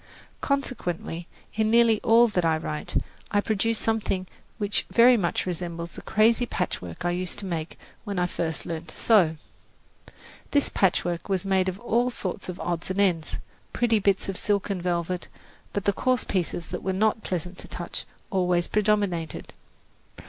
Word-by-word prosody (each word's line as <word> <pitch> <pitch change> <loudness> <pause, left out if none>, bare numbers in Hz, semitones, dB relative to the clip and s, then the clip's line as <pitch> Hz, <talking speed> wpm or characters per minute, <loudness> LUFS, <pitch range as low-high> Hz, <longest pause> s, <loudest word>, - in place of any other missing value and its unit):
Consequently, 180 - -2 0.3
in 215 0 +1
nearly 230 -1 +5
all 235 +2 +6
that 185 -5 0
I 160 -1 +3
write, 150 -1 -2 0.3
I 205 - +2
produce 220 +2 +1
something 215 -5 0 0.3
which 205 -2 0
very 245 +2 +7
much 180 -7 0
resembles 170 -1 -4
the - - -9
crazy 230 +3 +3
patchwork 125 - -3
I 175 - +2
used 180 0 -3
to 200 - -4
make 165 -3 -4 0.3
when 200 -3 -4
I 180 - +2
first 165 -2 -2
learned 165 0 -5
to - - -7
sew. 180 -9 +4 1.1
This 285 -1 +2
patchwork 175 -2 +1
was 195 -1 +1
made 190 -1 +2
of 185 +1 -6
all 240 +1 +1
sorts 220 -5 -4
of 180 - -5
odds 175 0 -2
and 190 +1 -1
ends 175 -6 +2 0.4
pretty 230 -2 +3
bits 195 -1 +1
of 195 -1 -3
silk 205 -1 0
and 190 -3 -2
velvet; 175 0 -1 0.4
but 205 - -3
the 200 - +3
coarse 255 +3 +1
pieces 175 -3 -2
that 180 - -4
were 190 - -1
not 215 +3 +2
pleasant 180 0 -3
to - - -5
touch - - -5 0.3
always 180 -3 +2
predominated. 205 -6 0
190 Hz, 165 wpm, -26 LUFS, 175-215 Hz, 1.1 s, very